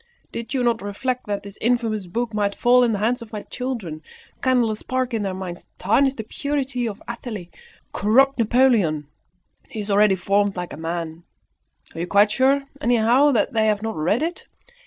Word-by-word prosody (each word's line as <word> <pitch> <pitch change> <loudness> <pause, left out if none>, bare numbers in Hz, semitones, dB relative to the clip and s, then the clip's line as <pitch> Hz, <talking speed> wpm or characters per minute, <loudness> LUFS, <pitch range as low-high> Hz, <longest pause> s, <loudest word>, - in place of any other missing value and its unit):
Did 230 0 -5
not 240 -3 +1
you 205 - -5
reflect 250 +5 -3
that 205 -1 -2
this 200 0 -11
infamous 225 -4 0
book 230 +5 -3
might 205 -1 0
fall 250 +1 +5
in 240 - +2
the 210 - 0
hands 235 +5 0
of 230 - -10
my 210 -2 -5
children, 225 -12 -5 0.4
kindle 250 -4 +3
a - - -2
spark 255 +3 -2
in 225 - 0
their 195 -2 -2
minds, 180 -2 -7
tarnish 265 +8 +2
the 220 - -5
purity 270 0 -2
of 205 -3 -7
Athalie, 220 -6 -6 0.4
corrupt 260 +7 +3
Napoleon. 220 - +3 0.6
He 220 - -6
is 205 0 -4
already 205 -1 +5
formed 200 +2 +1
like 180 -1 -5
a - - -5
man. 165 +1 -5 0.7
Are 165 - -7
you 175 - -2
quite 205 +2 +4
sure, 270 +3 +3 0.2
anyhow, 240 +4 +4
that 225 - +1
they 220 -1 +2
have 210 0 +1
not 225 0 -3
read 180 - +1
it? 340 +2 -4
220 Hz, 190 wpm, -22 LUFS, 200-250 Hz, 0.7 s, fall